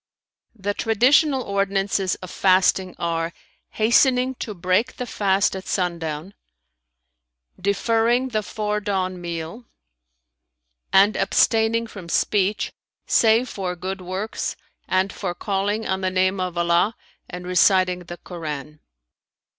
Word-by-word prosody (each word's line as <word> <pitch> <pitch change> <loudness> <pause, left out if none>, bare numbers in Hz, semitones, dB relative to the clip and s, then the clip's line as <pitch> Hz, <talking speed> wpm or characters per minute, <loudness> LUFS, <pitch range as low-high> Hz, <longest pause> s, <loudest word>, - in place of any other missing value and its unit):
The 205 -1 -2
traditional 260 +6 +3
ordinances 195 -1 0
of 185 - -10
fasting 185 -1 +2
are, 165 0 -2 0.4
hastening 250 +3 +3
to 210 - -5
break 185 +8 0
the 250 - -3
fast 195 -4 +1
at 190 - -7
sundown; 170 -1 -2 1.3
deferring 230 +6 +1
the 215 -3 -1
fore 210 +1 -2
dawn 185 -3 -2
meal,[FN#317] 170 +6 -5 1.3
and 200 +2 +5
abstaining 225 0 +2
from 195 -6 -10
speech, 205 +3 +1 0.3
save 230 +2 +4
for 185 -5 -4
good 185 +2 -5
works 185 +4 -4 0.3
and 185 +1 +1
for 180 -3 -4
calling 205 +3 -1
on 190 0 -1
the 185 - +1
name 185 +1 +1
of 180 -1 -3
Allah 170 +5 +2 0.3
and 180 -1 -7
reciting 180 0 +3
the 175 0 -9
Koran." 150 -4 -7
195 Hz, 115 wpm, -23 LUFS, 180-215 Hz, 1.3 s, and